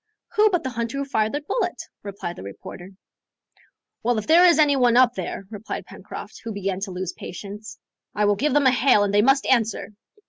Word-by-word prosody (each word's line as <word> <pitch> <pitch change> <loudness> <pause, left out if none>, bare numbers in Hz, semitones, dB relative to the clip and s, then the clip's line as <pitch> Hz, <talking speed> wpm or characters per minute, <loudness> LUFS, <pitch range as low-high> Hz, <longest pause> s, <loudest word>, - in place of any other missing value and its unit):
"Who 430 +1 +5
but 355 -4 0
the 260 - -3
hunter 235 +2 -3
who 280 - -2
fired 220 -5 0
the 290 - -2
bullet?" 360 +4 -2 0.2
replied 195 -4 -6
the - - -10
reporter. 100 - -9 1.1
"Well, 240 0 +1
if 215 - -3
there 345 +3 +6
is 340 - +5
any 295 -2 +4
one 245 -2 +3
up 250 -1 +5
there," 195 0 -5
replied 215 0 -6
Pencroft, - - -10
who 230 - -5
began 195 -2 -3
to 195 0 -5
lose 185 0 -4
patience, 210 +4 -9 0.4
"I 210 - +2
will 205 0 +3
give 280 +7 0
them 290 -1 +4
a 260 - +6
hail, 250 -3 +4
and 200 0 -1
they 205 - +5
must 270 +4 +3
answer." 230 -4 +1
230 Hz, 210 wpm, -23 LUFS, 205-275 Hz, 1.1 s, there